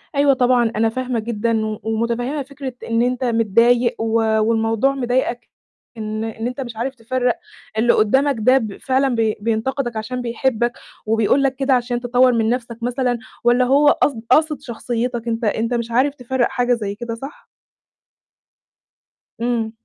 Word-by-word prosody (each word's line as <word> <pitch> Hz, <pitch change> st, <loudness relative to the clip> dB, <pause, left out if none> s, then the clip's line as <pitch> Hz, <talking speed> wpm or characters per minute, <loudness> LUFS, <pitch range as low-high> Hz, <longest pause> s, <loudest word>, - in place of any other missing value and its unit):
أيوه 280 Hz, -1 st, +4 dB
طبعًا، 245 Hz, -2 st, +2 dB
أنا 225 Hz, +1 st, +2 dB
فاهمة 250 Hz, 0 st, -2 dB
جدًا 225 Hz, 0 st, -1 dB
و 215 Hz, -1 st, -4 dB
ومتفهمة 235 Hz, +5 st, -1 dB
فكرة 275 Hz, -1 st, -7 dB
إن 230 Hz, 0 st, +1 dB
أنت 250 Hz, +1 st, 0 dB
متضايق، 235 Hz, +1 st, +3 dB
و 225 Hz, 0 st, -1 dB, 0.3 s
والموضوع 225 Hz, +4 st, +1 dB
مضايقك 245 Hz, -2 st, -1 dB, 0.5 s
إن 215 Hz, 0 st, -4 dB
إن 225 Hz, +1 st, -4 dB
أنت 250 Hz, +2 st, -5 dB
مش 240 Hz, -3 st, -6 dB
عارف 255 Hz, +4 st, -3 dB
تفرّق 245 Hz, +1 st, -1 dB, 0.4 s
اللي 235 Hz, +2 st, +4 dB
قدامك 265 Hz, +7 st, +3 dB
ده 255 Hz, +5 st, +5 dB
ب 220 Hz, -6 st, -3 dB
فعلًا 265 Hz, -1 st, +1 dB
ب 220 Hz, -2 st, +1 dB
بينتقدك 235 Hz, +3 st, -1 dB
عشان 250 Hz, +4 st, -4 dB
بيحبك، 240 Hz, 0 st, 0 dB, 0.3 s
وبيقول 225 Hz, +5 st, +2 dB
لك 270 Hz, -1 st, +1 dB
كده 270 Hz, 0 st, +1 dB
عشان 245 Hz, -1 st, 0 dB
تطوّر 250 Hz, +1 st, +3 dB
من 225 Hz, -1 st, +1 dB
نَفْسك 235 Hz, -1 st, -3 dB
مثلًا، 245 Hz, 0 st, 0 dB, 0.2 s
والّا 245 Hz, +1 st, +4 dB
هو 280 Hz, +3 st, +4 dB
قصد 275 Hz, -5 st, +1 dB
قاصد 300 Hz, +1 st, +3 dB
شخصيتك 240 Hz, -1 st, -3 dB
أنت، 230 Hz, 0 st, -2 dB
أنت 225 Hz, +2 st, 0 dB
مش 235 Hz, -1 st, -2 dB
عارف 270 Hz, +5 st, +2 dB
تفرّق 250 Hz, -1 st, -1 dB
حاجة 245 Hz, 0 st, +1 dB
زي 205 Hz, -4 st, -3 dB
كده 230 Hz, 0 st, -5 dB
صح؟ 270 Hz, +5 st, -10 dB, 1.9 s
إمم. 235 Hz, -2 st, -1 dB
240 Hz, 155 wpm, -20 LUFS, 225-255 Hz, 1.9 s, ده